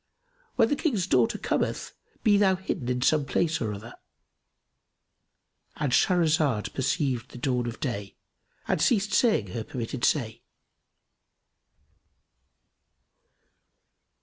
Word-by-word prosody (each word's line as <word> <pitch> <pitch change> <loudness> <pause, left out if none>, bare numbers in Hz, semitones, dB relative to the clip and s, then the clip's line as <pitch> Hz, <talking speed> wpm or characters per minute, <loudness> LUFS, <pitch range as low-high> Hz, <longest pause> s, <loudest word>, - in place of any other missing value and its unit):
When 230 -2 +4
the - - +2
King's 240 - 0
daughter 125 -9 +2
cometh - - -2 0.3
be 210 - +5
thou 195 -2 +4
hidden 180 -9 -4
in 125 0 0
some 155 +1 +3
place 155 +3 0
or 110 -3 -1
other";——And 120 +5 -12
Shahrazad 155 - +2
perceived 130 -3 -1
the - - -11
dawn 125 -1 -1
of 115 - -6
day 105 -7 -4 0.5
and - - 0
ceased 210 -3 +2
saying 125 - +2
her 115 +3 -4
permitted 120 +2 -5
say. 115 -7 0
135 Hz, 105 wpm, -27 LUFS, 120-185 Hz, 0.5 s, be